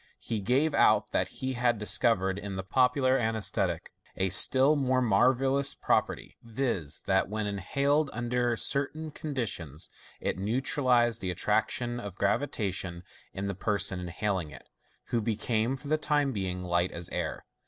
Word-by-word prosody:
He 110 -3 -4
gave 135 +9 +1
out - - +3
that - - +1
he 130 0 -4
had 120 -1 +1
discovered 100 -2 +2
in 100 -1 -6
the 95 - -4
popular 130 +5 +2
anaesthetic 110 -2 -1 0.3
a 95 0 +1
still 130 - +4
more 130 -3 +1
marvellous 130 +5 +3
property, - - -1
viz., 115 - -2
that 95 -1 +2
when 110 0 -2
inhaled 140 +9 0
under 120 0 -1
certain 150 +5 0
con 150 -1 -6
ditions, 90 - -4 0.3
it - - -2
neutralized 120 +1 +1
the 95 -2 -2
atti 90 +4 -4
action 120 +3 0
of 100 -5 -7
gravitation 100 -5 -2 0.3
in 95 - -5
the 100 - -2
person 95 -1 -1
inhal 95 +2 -1
ing 80 - -9
it, 75 - -13 0.4
who 120 - 0
became, 110 +3 0
for 145 - -11
the 155 +1 +1
time 145 -2 +1
being, 95 -5 -3
light 85 0 0
as 85 0 -3
air. - - -4
115 Hz, 155 wpm, -29 LUFS, 95-130 Hz, 0.4 s, still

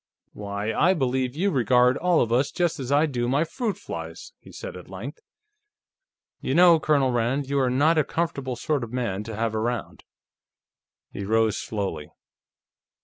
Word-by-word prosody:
"Why, 100 +1 -4
I 185 +4 +3
believe 130 -3 -1
you 195 +5 +1
regard 125 -1 +3
all 175 +2 +2
of 115 - 0
us 130 +4 +2
just 175 -3 -1
as 130 0 -4
I 145 +2 +4
do 125 -5 -2
my 140 +4 +2
fruit 215 +3 -3
flies!" 80 0 -8
he - - -15
said - - -8
at 90 -1 -11
length. 100 - -7 1.2
"You 135 - -2
know, 170 -1 +7
Colonel 140 -4 +2
Rand, 125 +4 0
you 140 0 0
are 130 -2 +2
not 150 +6 +3
a - - +3
comfortable 140 -5 -2
sort 140 +2 -1
of 115 - -7
man 115 -6 -2
to 110 -1 -6
have 110 +1 -1
around." 115 +2 -3 1.1
He 100 - -5
rose 110 +1 +1
slowly. 95 -8 -4
125 Hz, 170 wpm, -25 LUFS, 110-150 Hz, 1.2 s, know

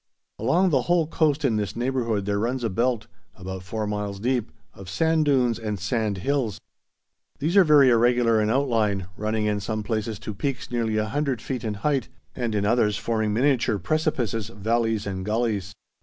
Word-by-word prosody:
Along 170 - +2
the 135 -3 +3
whole 175 -2 +4
coast 150 -2 +1
in 115 -5 +2
this 105 -2 -3
neighbourhood 120 -4 -1
there 100 0 0
runs 120 +3 -1
a 115 - 0
belt, 115 +1 0 0.3
about 95 0 -7
four 105 +4 -4
miles 105 -1 -3
deep, 120 0 -1 0.2
of 95 -2 -11
sand 160 - +2
dunes 125 -5 +2
and 105 -3 -3
sand 105 +1 -1
hills. 135 -7 0 0.8
These 160 +6 -1
are 195 - +8
very 145 -5 +6
irregular 120 -1 +3
in 105 - +1
outline, 110 -7 +1
running 110 +1 -1
in 105 -1 0
some 110 +1 -3
places 110 0 -2
to 110 - -6
peaks 130 +6 -4
nearly 115 -3 0
100 130 +4 -1
feet 130 -4 -4
in 110 -2 -2
height, 135 -5 +1 0.3
and 120 -4 -2
in 100 -1 +1
others 105 -2 +2
forming 110 -2 -1
miniature 125 -1 +2
precipices, 115 - -1
valleys 115 0 -1
and 95 -2 -4
gullies. 105 -2 -1
115 Hz, 175 wpm, -25 LUFS, 105-130 Hz, 0.8 s, are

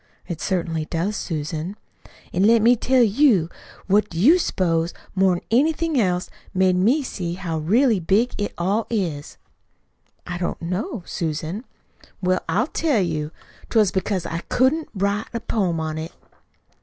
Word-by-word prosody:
"It 170 - -5
certainly 165 -4 -1
does, 170 +7 -2
Susan." 160 +2 -4 0.6
"An' 180 - +1
let 225 +2 +5
me 240 +2 +6
tell 255 +2 +3
you. 215 - +3 0.4
What 205 +2 +2
do 165 - -5
you 310 - +6
s'pose, 170 - 0 0.2
more 190 -1 +3
'n 175 - -5
anything 310 +4 +2
else, 180 -2 0 0.3
made 185 -1 +3
me 235 +12 +3
see 175 -8 -4
how 170 -4 -3
really 220 - +3
big 200 +8 +2
it 205 - -1
all 200 +6 0
is?" 170 -10 -3 0.9
"I 175 -1 -5
don't 175 - -2
know, 185 - -3
Susan," 165 - -3 0.5
"Well, 185 0 0
I'll 200 +9 +2
tell 300 -4 +1
you. 160 -5 -1 0.4
'Twas 215 -5 +3
because 190 -1 -1
I 165 - -3
couldn't 285 +5 +2
write 200 +2 0
a - - 0
poem 185 -8 -1
on 155 0 -3
it." 160 +2 -6
190 Hz, 155 wpm, -22 LUFS, 170-225 Hz, 0.9 s, me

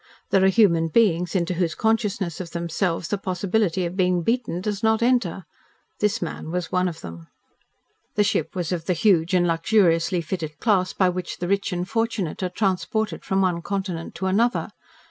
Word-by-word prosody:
There 190 - +4
are - - +6
human 185 -5 +4
beings 180 -2 +2
into 180 -1 +1
whose 170 -2 -1
consciousness 210 -6 0
of 175 - -7
themselves 170 0 -2
the 205 - -1
possibility 190 -1 0
of 170 +1 -4
being 180 -2 +1
beaten 230 -4 -1
does 205 +1 -3
not 220 +1 +2
enter. 235 -8 +1 0.5
This 210 0 +1
man 160 -1 -6
was 175 0 -3
one 180 0 +2
of 170 -2 -6
them. 85 -1 -9 0.9
The 210 - +4
ship 205 - -1
was 175 -2 -2
of 170 -3 -2
the 180 - +1
huge 180 -2 +3
and 175 -1 +3
luxuriously 170 0 +2
fitted 160 -2 -5
class 190 -5 +2
by 185 -2 +2
which 180 0 -4
the 175 - -3
rich 200 +1 0
and 180 0 -2
fortunate 225 -7 -2
are 185 - -1
transported 205 +3 -1
from 190 0 +1
one 175 -2 0
continent 190 -3 -4
to 190 - -4
another. 225 +6 +1
185 Hz, 185 wpm, -23 LUFS, 170-205 Hz, 0.9 s, are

